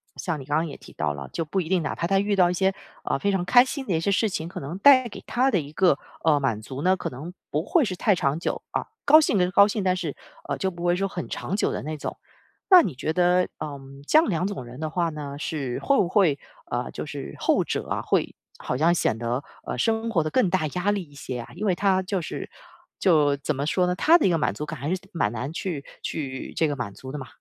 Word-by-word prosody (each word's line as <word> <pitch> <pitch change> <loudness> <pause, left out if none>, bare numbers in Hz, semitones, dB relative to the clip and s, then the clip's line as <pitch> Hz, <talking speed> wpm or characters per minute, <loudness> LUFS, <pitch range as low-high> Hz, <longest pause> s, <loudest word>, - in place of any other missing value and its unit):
像 165 -6 -3
你 135 - -9
刚 145 +2 -1
刚 165 +1 0
也 145 - -8
提 - - -15
到 75 -1 -1
了， 70 -2 -7
就 165 - -1
不 165 +5 -2
一 170 - -2
定， 185 -2 +2
哪 155 - -3
怕 - - -2
他 195 +2 +2
遇 205 +1 +1
到 180 -2 +4
一 - - -1
些， 190 +2 +2 0.3
呃， - - 0
非 200 - 0
常 190 -2 0
开 245 +8 +7
心 270 +1 -5
的 190 - 0
一 - - 0
些 185 +5 0
事 215 +3 +2
情， 165 -4 -3
可 175 - -7
能 145 +6 -6
带 255 +2 +6
给 205 - -10
他 255 +2 +2
的 200 - +2
一 145 -2 -7
个， 175 -2 +3 0.3
呃， 155 -3 +4
满 115 -6 -1
足 130 +5 -7
呢， 185 +1 +4
可 - - -4
能 150 +8 -8 0.2
不 150 +2 -1
会 335 - +3
是 195 -7 -2
太 205 +3 +3
长 150 -3 0
久， - - -2
啊。 - - -2 0.2
高 310 +2 +8
兴 290 -9 +2
能 180 -1 +2
高 200 +1 +7
兴， 210 -1 -2
但 185 -1 +2
是， 165 -6 -4 0.3
呃， - - -2
就 190 - 0
不 175 0 -6
会 175 0 +3
说 195 +2 0
很 180 -3 -5
长 190 - -3
久 205 - +1
的 - - -3
那 155 +2 -5
种。 - - -5 0.5
那 370 -3 +10
你 180 - -2
觉 145 +4 -2
得， 180 +2 +3
呃， 145 -2 -5 0.3
这 - - +5
样 320 - +1
两 180 -1 0
种 200 -10 -5
人 120 +2 -11
的 155 0 -2
话 170 +1 0
呢， 145 -3 -6
是 140 -4 -3
会 275 - +2
不 190 - +3
会， 170 -7 +3 0.3
呃 - - -2
就 - - -5
是 - - -7
后 - - +2
者 - - -3
啊， - - -1
会 - - 0 0.2
好 125 - -3
像 165 +5 +4
显 115 -9 +1
得， 120 +4 -2 0.2
呃， - - -4
生 225 - 0
活 165 -7 +2
得 155 - -2
更 200 +1 +2
大 175 -3 +1
压 180 +6 0
力 205 -2 -1
一 145 -4 -18
些 130 -3 -6
啊？ 120 - -8
因 205 +5 -4
为 190 -3 +2
他 190 0 +2
就 185 0 -2
是 - - -6 0.5
就 150 -6 +4
怎 140 +2 -2
么 140 +1 -2
说 180 +4 +2
呢？ 180 0 0
他 320 - +6
的 - - +1
一 - - +3
个 170 - +2
满 150 - 0
足 150 - -5
感 155 -2 -7
还 140 +4 -3
是 185 - -8
蛮 165 -11 0
难 125 +5 -4
去 165 -4 -4 0.2
去 135 -4 -5
这 160 - +2
个 145 - -2
满 110 -6 -4
足 130 +5 -9
的 150 - -5
嘛。 130 - -7
175 Hz, 300 characters per minute, -25 LUFS, 145-195 Hz, 0.5 s, 那